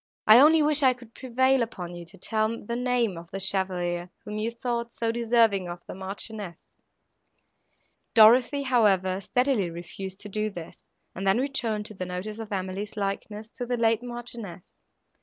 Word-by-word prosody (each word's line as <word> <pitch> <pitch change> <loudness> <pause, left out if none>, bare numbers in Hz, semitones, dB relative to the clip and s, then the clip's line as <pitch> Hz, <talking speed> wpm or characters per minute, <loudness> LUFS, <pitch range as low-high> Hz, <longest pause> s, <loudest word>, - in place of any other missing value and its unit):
I 215 +3 +9
only 310 +3 +6
wish 300 0 +3
I 260 -2 +5
could 240 -2 -16
prevail 260 +1 +2
upon 180 -7 -4
you 175 0 -8
to 185 +4 -15
tell 220 +4 -1
the 235 - -3
name 245 -7 0
of 170 0 -13
the 195 - -5
chevalier, 180 -2 -1 0.2
whom 210 0 -5
you 220 +2 -1
thought 235 0 -3
so 230 -1 -1
deserving 225 -5 +2
of 175 0 -8
the - - -8
Marchioness." 195 -1 -5 1.6
Dorothée, 245 +5 +6
however, 195 -7 +2
steadily 250 -3 +1
refused 180 +3 -8
to 210 - -5
do 215 +1 -1
this, 175 -5 -10 0.3
and 195 +2 -4
then 195 - +4
returned 240 -6 -1
to 215 - -9
the 185 -2 -5
notice 190 +5 -5
of 220 -2 -7
Emily's 195 +2 -4
likeness 210 +2 -4
to 245 - -5
the 245 0 -1
late 225 -1 +2
Marchioness. 240 -7 -8
215 Hz, 170 wpm, -26 LUFS, 190-240 Hz, 1.6 s, I